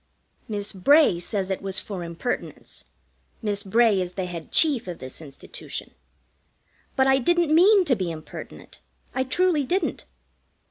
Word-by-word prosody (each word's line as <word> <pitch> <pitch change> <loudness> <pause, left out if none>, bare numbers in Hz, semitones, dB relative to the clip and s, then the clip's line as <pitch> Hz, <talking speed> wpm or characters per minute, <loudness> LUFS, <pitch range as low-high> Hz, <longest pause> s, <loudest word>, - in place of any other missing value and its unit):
Miss 205 -1 -3
Bray 240 - +5
says 195 +1 -2
it 190 - -2
was 195 -1 -1
for 185 -2 -5
impertinence 170 +8 -5 0.6
(Miss 205 -2 -1
Bray 210 0 +3
is 180 0 -4
the 190 -1 -3
Head 170 -3 -7
Chief 285 - +3
of 175 -2 -5
this 130 +4 -8
Institution), 140 -3 -8 1.0
but 265 - +4
I 265 0 +4
didn't 340 +3 +2
mean 380 +4 +6
to 270 -6 +3
be 185 -4 -2
impertinent. 155 -2 -9 0.3
I 260 - +1
truly 320 +3 +2
didn't. 335 +1 -1
210 Hz, 145 wpm, -25 LUFS, 180-290 Hz, 1.0 s, mean